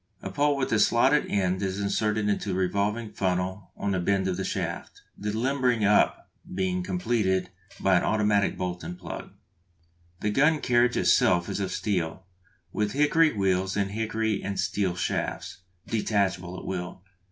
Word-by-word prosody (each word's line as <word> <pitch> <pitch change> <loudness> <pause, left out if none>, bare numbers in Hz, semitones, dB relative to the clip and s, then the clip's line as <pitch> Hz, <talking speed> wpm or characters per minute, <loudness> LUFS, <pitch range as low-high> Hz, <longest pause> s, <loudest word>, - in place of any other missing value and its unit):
A - - -5
pole 145 0 +2
with 130 - -1
a 110 - +3
slotted 130 +7 +4
end 95 -1 0
is 95 0 -2
inserted 105 +1 0
into 105 0 -1
a - - -1
revolving 100 +4 -1
funnel 95 0 -2
on 100 - -1
the 95 - 0
bend 95 +1 +1
of 95 - 0
the 95 - -3
shaft, - - -4
the 105 - -4
limbering 125 -1 +1
up 105 +1 +3 0.2
being 90 -1 -1
completed 95 0 0 0.3
by 95 -1 +4
an - - +1
automatic 105 -1 +2
bolt 90 -1 -4
and 90 +2 -6
plug. 90 -2 -7 0.9
The 105 - 0
gun 150 +7 +3
carriage 120 -2 +2
itself 85 0 +3
is - - -3
of 95 -2 -2
steel, 95 -3 -2 0.5
with 105 -1 -1
hickory 150 +2 +4
wheels 95 -1 0
and 100 -1 0
hickory 110 -1 -1
and 100 0 -4
steel 95 -4 0
shafts, 90 - -3 0.3
detachable 95 -5 -1
at - - -9
will. 90 0 -5
100 Hz, 165 wpm, -27 LUFS, 95-110 Hz, 0.9 s, slotted